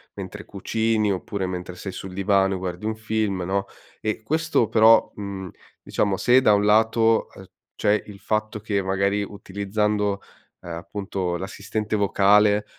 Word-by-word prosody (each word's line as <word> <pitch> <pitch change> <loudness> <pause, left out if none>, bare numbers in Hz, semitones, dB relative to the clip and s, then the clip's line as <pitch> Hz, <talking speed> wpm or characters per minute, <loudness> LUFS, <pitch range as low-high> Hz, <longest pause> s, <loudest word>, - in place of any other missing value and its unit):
mentre - - -7
cucini 110 -2 0
oppure 95 +1 -3
mentre 90 0 -5
sei 95 0 -6
sul 95 - -7
divano 95 0 +2
e - - -3
guardi 90 +2 -5
un 110 0 -2
film, 110 -4 -1
no? 100 +1 -1 0.4
E 110 0 -2
questo 155 -3 +1
però, 110 0 +5
mhmm, 100 -3 -6 0.3
diciamo 100 -2 0
se 125 +2 +5
da 105 -5 +5
un 105 0 +2
lato, 110 +1 +3
uhm, 95 - -12 0.3
c'è 105 +1 +1
il 100 -1 -11
fatto 110 0 -2
che 100 -2 -1
magari 100 +2 0
utilizzando, 100 0 -1 0.4
ehm, - - -8
appunto, 90 +1 -3
l'assistente 105 +3 -4
vocale 105 +1 +4
105 Hz, 150 wpm, -24 LUFS, 95-110 Hz, 0.4 s, però